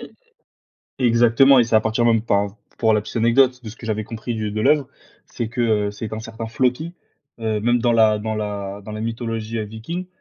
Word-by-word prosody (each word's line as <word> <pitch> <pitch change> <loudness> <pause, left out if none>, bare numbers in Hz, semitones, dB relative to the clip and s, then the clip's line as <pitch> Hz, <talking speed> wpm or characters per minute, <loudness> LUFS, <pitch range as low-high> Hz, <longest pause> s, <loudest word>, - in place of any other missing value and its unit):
E - - -8 0.9
e - - +1
exactement, 120 +3 +5
et 120 - +5
c'est 115 -1 -3
à 110 - +7
partir 110 +1 0
même, 115 -1 +4
enfin, 100 -1 +1 0.2
pour 110 -1 +3
la 105 - +3
petite 105 - -9
anecdote, 125 +2 +3
de 110 - -6
ce 110 - -10
que 115 - -10
j'avais 110 -1 -2
compris 115 +2 -5
du 110 -2 -3
de 110 - -2
l'œuvre, 140 +2 +3 0.4
c'est 115 -3 -4
que 110 -4 0
c'est 105 +2 -6
qu'un 110 +1 -5
certain 115 +1 -7
Floki, 125 +9 -1 0.5
heu, 110 -2 -1
même 120 +2 +2
dans 120 -1 +2
la 110 -2 +4
dans 110 +1 -3
la 100 -1 -4
dans 105 - -8
la 110 - -5
mythologie, 115 0 -3
heu, 110 - -1
Viking, 115 - -6
115 Hz, 225 wpm, -21 LUFS, 110-120 Hz, 0.9 s, à